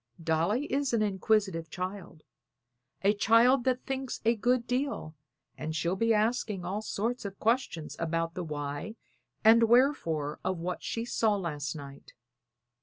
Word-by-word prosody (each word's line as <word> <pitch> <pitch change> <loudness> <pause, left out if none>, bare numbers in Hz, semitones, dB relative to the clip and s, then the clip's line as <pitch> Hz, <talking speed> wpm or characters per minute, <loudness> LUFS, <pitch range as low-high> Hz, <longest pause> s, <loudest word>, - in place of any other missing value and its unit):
Dolly 170 - +1
is 275 -2 0
an 220 -2 +3
inquisitive 195 -4 0
child; 185 -2 -6 0.8
a 200 +1 +5
child 230 +5 +4
that 255 -1 0
thinks 270 -2 -3
a 230 +1 +4
good 240 +2 +1
deal, 250 - -2 0.5
and 155 0 -4
she'll 170 +3 0
be 230 +4 +1
asking 215 -4 0
all 195 +4 -2
sorts 230 +3 -2
of 200 -1 -6
questions 225 -9 -1
about 165 0 -1
the 180 - -4
why 145 +6 -5 0.5
and 230 +1 +6
wherefore 195 - +2
of 185 -1 -1
what 175 +2 -4
she 230 0 -3
saw 220 -3 +1
last 155 -5 -3
night." 140 -2 -11
205 Hz, 145 wpm, -29 LUFS, 165-235 Hz, 0.8 s, and